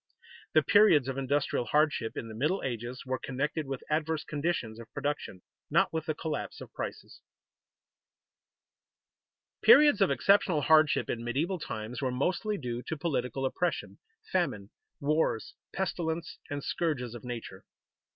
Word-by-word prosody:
_The 155 - +5
periods 205 - +6
of 135 0 -2
industrial 135 -2 0
hardship 150 -6 +1
in 115 - -4
the 110 - -8
Middle 150 - 0
Ages 120 0 -4
were 130 0 -2
connected 145 +3 -2
with 135 -1 -4
adverse 155 0 0
conditions 145 -8 -2
of 115 - -11
production, 140 -10 -3 0.3
not - - +3
with 160 -1 -2
the 155 - 0
collapse 155 -1 -4
of - - -11
prices._ - - -6 2.4
Periods 300 - +7
of - - +5
exceptional 175 +3 +3
hardship 155 +1 +4
in 115 - -3
medieval 155 +10 -1
times 110 -2 -5
were 130 - +1
mostly 180 - 0
due 120 -5 -4
to 160 - -3
political 135 -4 -1
oppression, 175 +6 -2 0.3
famine, 130 - -1 0.3
wars, 150 -6 0 0.2
pestilence, 170 -3 -3
and 145 -1 -4
scourges 130 -9 -1
of 120 - -9
nature. 120 -2 -7
145 Hz, 140 wpm, -30 LUFS, 125-160 Hz, 2.4 s, Periods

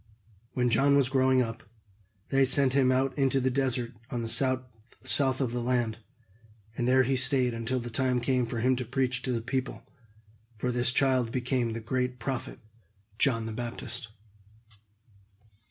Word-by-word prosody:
When 125 -1 +1
John 140 +5 +4
was 135 -3 +3
growing 130 -1 +3
up, 115 -1 -6 0.7
they 135 0 +3
sent 135 0 +4
him 135 -2 +3
out 130 +1 0
into 135 0 +2
the 130 0 0
desert 125 -2 -1 0.2
on 120 -3 -3
the - - -3 0.8
south 130 -2 0
of 130 -4 -1
the 120 0 -3
land, 120 -2 -1 0.8
and 120 - -1
there 130 +1 +4
he 135 +2 0
stayed 125 -1 +4
until 115 +3 -2
the 120 0 -7
time 130 +1 +1
came 125 0 0
for 115 -1 -3
him 130 +2 +3
to 125 - -2
preach 125 0 0
to 130 - -2
the 115 -2 -2
people; 130 +2 -3 0.7
for 125 +4 -2
this 120 0 +3
child 130 -3 +2
became 125 -2 -1
the 115 - -4
great 125 +2 -2
prophet 130 +1 -4 0.6
John 115 -5 +2
the 110 - -5
Baptist. 120 0 -5
125 Hz, 165 wpm, -28 LUFS, 120-130 Hz, 0.8 s, John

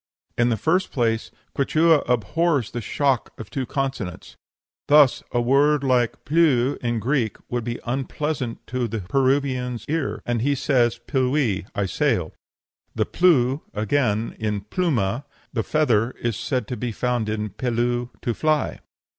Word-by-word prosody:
In 120 0 +2
the 115 - +1
first 180 - +1
place, 115 -3 0 0.3
Quichua 155 +3 +4
abhors 130 - +1
the 120 - -4
shock 135 +2 0
of 115 - -8
two 135 -4 -3
consonants. 135 -10 -4 0.5
Thus, 145 -3 +6
a 120 - +1
word 140 +4 +3
like 125 -3 +1
ple'w 145 -5 +3
in 120 -1 -2
Greek 115 -1 0
would 120 -1 -1
be 120 +1 -4
unpleasant 135 0 -3
to 125 -1 -2
the 115 -2 -4
Peruvian's 130 +1 0
ear, 160 -1 -2
and 120 -2 0
he 140 +3 +2
says 120 -3 +2
pillui, 130 -8 +1
'I 100 -1 0
sail.' 105 - 0 0.6
The - - +1
plu, 145 -6 +3
again, 110 0 0
in 105 -2 -1
pluma, 120 - -1 0.3
a 115 - +2
feather, 120 -5 +1
is 120 -2 -1
said 125 +3 -2
to 125 - -2
be 120 -1 -3
found 120 -1 -1
in 105 0 -2
pillu, 120 0 -1
'to 120 - 0
fly.' 155 +3 0
125 Hz, 145 wpm, -23 LUFS, 115-140 Hz, 0.6 s, Thus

